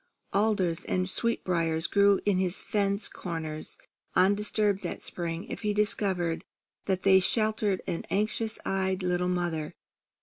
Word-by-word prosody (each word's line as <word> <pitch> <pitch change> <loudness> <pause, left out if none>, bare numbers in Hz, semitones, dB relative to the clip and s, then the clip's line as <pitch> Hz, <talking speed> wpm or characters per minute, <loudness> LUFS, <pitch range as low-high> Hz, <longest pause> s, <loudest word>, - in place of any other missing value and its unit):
Alders 200 -6 +1
and 185 0 0
sweetbriers 170 -7 0
grew 200 +1 +4
in 200 -3 +2
his 185 -1 +1
fence 200 0 0
corners 160 -3 -6 0.4
undisturbed 205 +1 +2
that - - -5
spring 170 0 -3
if - - -7
he 210 -2 0
discovered 190 -5 +1 0.4
that 190 -2 -1
they 190 -1 +7
sheltered 215 -1 +1
an 170 -2 -3
anxious 215 +2 0
eyed 190 0 0
little 180 0 +1
mother. 175 -4 -2
190 Hz, 130 wpm, -28 LUFS, 175-205 Hz, 0.4 s, they